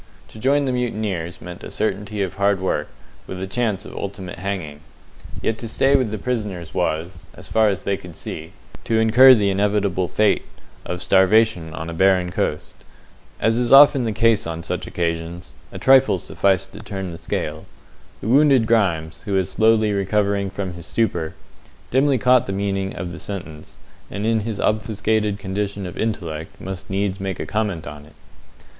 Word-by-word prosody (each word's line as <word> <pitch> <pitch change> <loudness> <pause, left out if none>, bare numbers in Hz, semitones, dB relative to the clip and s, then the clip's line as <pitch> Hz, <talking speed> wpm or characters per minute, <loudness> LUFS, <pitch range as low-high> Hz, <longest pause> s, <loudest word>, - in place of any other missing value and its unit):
To 110 - -12
join 140 +4 +2
the 130 - 0
mutineers 105 -9 -3
meant 90 0 -9
a - - -7
certainty 105 0 -2
of 95 -1 -4
hard 100 0 +1
work, 95 - -1 0.4
with 95 - -6
a 95 - -3
chance 105 -1 -2
of - - -10
ultimate 95 -3 -6
hanging. 90 -7 -4 0.6
Yet 110 0 -1
to 115 - -6
stay 135 +5 +2
with 130 -5 +2
the 110 - -4
prisoners 100 -8 -4
was 85 0 -2
as - - -10
far 110 -1 +3
as 100 - -3
they 100 -1 0
could 90 -4 -12
see 80 +1 -7 0.3
to 115 - +1
incur 120 +4 +7
the 100 -3 +1
inevitable 100 -2 +1
fate 105 +2 +2 0.5
of 90 0 -4
starvation 95 -3 +3
on 80 - -5
a 85 - -5
barren 90 0 +3
coast. - - -2 0.7
As 115 +1 +2
is 120 -1 0
often 140 -2 +8
the 110 - 0
case 115 -3 +2
on 85 0 -5
such - - -4
occasions, 85 -1 -3 0.2
a - - -7
trifle 135 -5 +5
sufficed 95 +1 0
to - - -9
turn 95 -3 -5
the 85 - -9
scale. 75 +1 -4 0.5
The - - -5
wounded 135 -1 +5
Grimes, 85 -8 +1
who 100 - -3
was 95 -1 0
slowly 110 -1 +3
recovering 100 0 0
from 95 -1 -5
his 85 -1 -10
stupor, 85 -8 -1 0.6
dimly 135 +1 +3
caught 125 +1 +4
the 95 - -2
meaning 95 -1 -2
of 85 0 -5
the 80 - -8
sentence, 85 -6 -8 0.3
and 100 +1 -4
in 115 0 +2
his 110 -1 -4
obfuscated 105 -1 0
condition 100 0 -3
of 90 - -7
intellect 85 -8 -4
must 95 -1 -7
needs 95 0 -1
make 95 -1 -3
comment 105 -7 -2
upon 75 0 -9
it. 75 - -19
100 Hz, 175 wpm, -21 LUFS, 90-110 Hz, 0.7 s, often